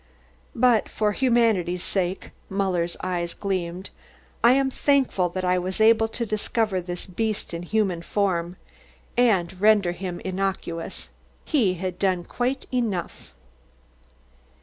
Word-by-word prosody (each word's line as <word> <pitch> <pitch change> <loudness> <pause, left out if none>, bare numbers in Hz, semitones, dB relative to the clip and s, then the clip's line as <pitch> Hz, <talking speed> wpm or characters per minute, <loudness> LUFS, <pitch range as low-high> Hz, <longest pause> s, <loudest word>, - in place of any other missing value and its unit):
"But 240 -2 +3
for 210 -1 0
humanity's 220 -8 +2
sake" 185 -1 -2 0.2
(Muller's 185 -3 -1
eyes 175 -2 -2
gleamed), 185 -2 -3 0.5
"I 235 +2 +7
am 270 0 +2
thankful 260 -11 +2
that 185 +1 -3
I 180 0 +2
was 185 +3 -4
able 225 0 +5
to 235 +1 -3
discover 215 -2 0
this 175 0 -5
beast 215 +1 -2
in 170 - -4
human 185 -2 0
form 175 -2 -1 0.6
and 190 -7 +2
render 210 -4 +5
him 175 0 -5
innocuous; 185 -3 -3 0.4
he 220 -12 +2
had 185 0 -4
done 185 -3 +1
quite 250 +8 -2
enough." 220 -8 -2
190 Hz, 125 wpm, -24 LUFS, 180-220 Hz, 0.6 s, I